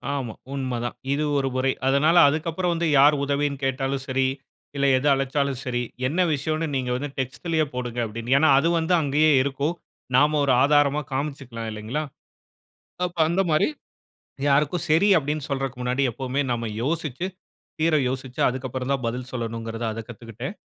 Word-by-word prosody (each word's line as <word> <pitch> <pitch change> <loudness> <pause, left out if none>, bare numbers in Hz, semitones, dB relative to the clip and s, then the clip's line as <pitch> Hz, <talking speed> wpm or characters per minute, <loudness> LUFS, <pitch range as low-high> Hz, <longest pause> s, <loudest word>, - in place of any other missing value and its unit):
ஆமா. 125 -5 -3 0.2
உண்ம 130 -3 -2
தான். 120 - -4 0.2
இது 150 +2 0
ஒரு 135 -1 0
முறை. 130 +1 +2 0.2
அதனால 150 +5 +4
அதுக்கப்புறம் 165 +4 -1
வந்து 170 0 0
யார் 145 +2 +6
உதவின்னு 140 0 -1
கேட்டாலும் 135 0 -1
சரி 130 0 +1 0.5
இல்ல, 140 0 +1
எது 130 +3 +1
அழைச்சாலும் 135 -1 0
சரி, 120 -1 -1 0.3
என்ன 165 +7 0
விஷயம்ன்னு 155 +2 -1
நீங்க 130 -2 -1
வந்து 145 +3 -3
டெக்ஸ்ட்லேயே 155 +5 -1
போடுங்க 125 -1 -4
அப்படின்னு, 115 +3 -3
ஏன்னா 155 +3 +4
அது 155 +5 +3
வந்து 165 +2 0
அங்கேயே 150 +2 +3
இருக்கும். 140 +4 -1 0.4
நாம் 145 +3 +5
ஒரு 140 -2 +2
ஆதாரமா 145 0 +3
காமிச்சிக்கலாம் 130 -5 -4
இல்லங்களா. 110 +8 -3 1.0
அப்போ, 175 -1 -6
அந்த 175 +3 +2
மாதிரி 155 -1 +3 0.8
யாருக்கும் 150 +4 +2
சரி 165 +6 +4
அப்படின்னு 150 0 -2
சொல்றதுக்கு 135 -2 -3
முன்னாடி 125 +2 0
எப்போதுமே 130 +3 -2
நாம் 115 -1 -1 0.2
யோசிச்சி, 155 +2 -2 0.5
தீர 160 -1 +3
யோசிச்சி 130 -1 -5
அதுக்கப்புறம் 130 0 -4
தான் 135 -3 -2
பதில் 125 +2 -4
சொல்லணும்ங்குறத 115 -1 -4
அத 115 - -5
கத்துக்கிட்டேன். 120 - -7
135 Hz, 155 wpm, -24 LUFS, 125-150 Hz, 1.0 s, யார்